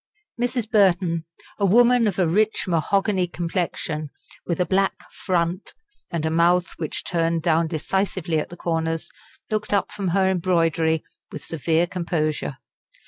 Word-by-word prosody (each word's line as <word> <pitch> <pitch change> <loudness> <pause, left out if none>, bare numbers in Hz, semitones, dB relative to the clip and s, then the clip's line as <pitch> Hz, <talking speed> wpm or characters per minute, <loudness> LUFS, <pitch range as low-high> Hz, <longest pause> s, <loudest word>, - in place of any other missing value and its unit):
Mrs. 245 -2 -1
Burton, 180 -6 +2 0.3
a 200 - +3
woman 240 +3 +5
of 195 - -1
a 180 -3 +3
rich 215 +6 +1
mahogany 185 +2 +1
complexion, 165 -3 -3 0.4
with 170 - -1
a 180 - +3
black 195 +1 +1 0.2
"front," 175 0 -2 0.3
and 170 -3 -2
a 160 - 0
mouth 175 +2 +3
which 155 -3 -4
turned 165 -1 0
down 165 -1 +2
decisively 170 0 -1
at - - -4
the 175 - -10
corners, 165 0 -2 0.4
looked 215 -1 -1
up 200 - +1
from 200 -2 -4
her 190 +2 +2
embroidery 165 -3 +1 0.3
with - - -7
severe 165 +1 +1
composure. 155 -5 -2
175 Hz, 140 wpm, -23 LUFS, 165-190 Hz, 0.4 s, woman